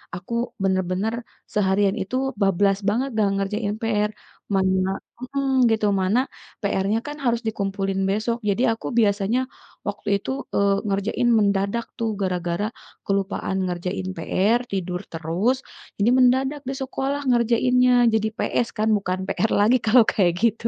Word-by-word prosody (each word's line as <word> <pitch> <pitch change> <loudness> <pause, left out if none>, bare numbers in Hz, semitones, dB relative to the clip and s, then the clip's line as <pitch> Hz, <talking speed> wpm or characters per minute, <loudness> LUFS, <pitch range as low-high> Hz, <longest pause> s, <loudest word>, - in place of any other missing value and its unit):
aku 180 +6 -7 0.3
bener-bener, 190 +3 0 0.4
seharian 195 -1 +2
itu 195 +7 -4 0.3
bablas 195 0 +3
banget 255 +6 0
nggak 210 -2 +2
ngerjain 205 +1 -1
PR, 210 -2 +1 0.4
mana 190 -1 +2 0.3
mhm, 265 -1 +1
gitu 220 -1 +1 0.2
mana 190 +6 +2 0.4
PR-nya 200 +2 +1
kan 295 0 -5
harus 235 -1 +1
dikumpulin 195 -2 -2
besok 220 +3 0
jadi 200 +4 +1
aku - - -8
biasanya, 205 +2 +2 0.5
waktu 205 - -5
itu, 200 - -5 0.2
eee, 200 0 +3
ngerjain 200 +4 0
mendadak 200 +2 +1
tuh 225 -1 0
gara-gara 180 0 -1 0.4
kelupaan 195 -1 -1
ngerjain 180 +2 -3
PR, 205 +8 +2
tidur 180 -2 -2
terus, 170 +10 0 0.4
ini 220 - +4
mendadak 265 +3 +3
di - - -2
sekolah 270 +2 -2
ngerjainnya, 250 +1 +3 0.2
jadi 220 0 +2
PS 240 - 0
kan, 215 +1 +1
bukan 185 -2 -2
PR 220 +2 0
lagi 235 +5 +5
kalau 230 +2 +6
kayak 180 -4 +2
gitu. 230 0 +1
205 Hz, 135 wpm, -23 LUFS, 195-235 Hz, 0.5 s, kalau